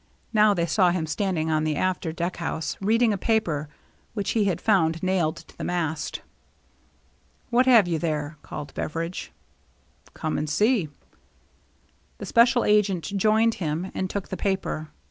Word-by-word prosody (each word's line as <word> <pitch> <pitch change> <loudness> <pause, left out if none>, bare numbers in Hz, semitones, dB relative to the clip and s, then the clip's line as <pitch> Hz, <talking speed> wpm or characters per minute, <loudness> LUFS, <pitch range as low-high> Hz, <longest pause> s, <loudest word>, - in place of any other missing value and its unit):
Now 210 -1 +5
they 170 -2 +1
saw 180 +2 +3
him 175 -2 -1
standing 160 -2 -1
on 155 0 +1
the 155 -1 0
after 180 -1 -1
deck 170 +2 -3
house, 160 -1 -3
reading 225 +2 +3
a 200 - -3
paper 165 -11 0 0.5
which 205 -2 -1
he 220 -3 +2
had 185 -5 0
found 165 -6 +2
nailed 180 -4 +1
to - - -14
the - - -7
mast. 160 -3 -2 0.6
" - - -38
What 250 +2 +4
have 230 -7 +6
you 165 -2 0
there? 150 -2 -2
" - - -36
called 145 - -8
Beveridge. 165 +3 -4 0.4
" - - -30
Come 155 - -2
and 150 0 -3
see." 210 - +2 1.3
The - - -7
special 240 +1 +4
agent 200 -2 +2
joined 220 +3 +3
him 165 +3 -2
and 185 - -2
took 200 0 -4
the 190 - -4
paper. 190 -5 -2
180 Hz, 165 wpm, -25 LUFS, 160-210 Hz, 1.3 s, have